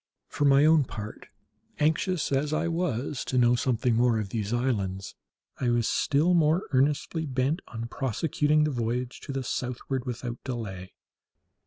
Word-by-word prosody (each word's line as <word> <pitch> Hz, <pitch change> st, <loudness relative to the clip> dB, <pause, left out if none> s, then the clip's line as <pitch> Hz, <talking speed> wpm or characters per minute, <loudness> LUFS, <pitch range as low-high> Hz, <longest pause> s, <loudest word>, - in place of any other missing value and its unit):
For 145 Hz, -, 0 dB
my 140 Hz, +1 st, +6 dB
own 160 Hz, -1 st, +5 dB
part, 105 Hz, -3 st, -8 dB, 0.5 s
anxious 160 Hz, +2 st, +1 dB
as 145 Hz, +2 st, 0 dB
I 165 Hz, +2 st, 0 dB
was 150 Hz, -6 st, -2 dB
to 130 Hz, -, -1 dB
know 120 Hz, -1 st, +5 dB
something 125 Hz, -1 st, +1 dB
more 120 Hz, 0 st, +3 dB
of 105 Hz, -3 st, -3 dB
these 105 Hz, -1 st, -3 dB
islands, 100 Hz, -6 st, -1 dB, 0.5 s
I 125 Hz, -, +1 dB
was 120 Hz, -2 st, +2 dB
still 155 Hz, +6 st, +2 dB
more 165 Hz, +1 st, +3 dB
earnestly 150 Hz, +4 st, +1 dB
bent 135 Hz, +5 st, 0 dB
on 115 Hz, -1 st, -6 dB
prosecuting 150 Hz, -, +1 dB
the 150 Hz, -, +1 dB
voyage 120 Hz, 0 st, -2 dB
to -, -, -7 dB
the 135 Hz, -1 st, -2 dB
southward 125 Hz, +1 st, -3 dB
without 120 Hz, 0 st, -5 dB
delay. 100 Hz, -8 st, -6 dB
130 Hz, 155 wpm, -27 LUFS, 120-150 Hz, 0.5 s, my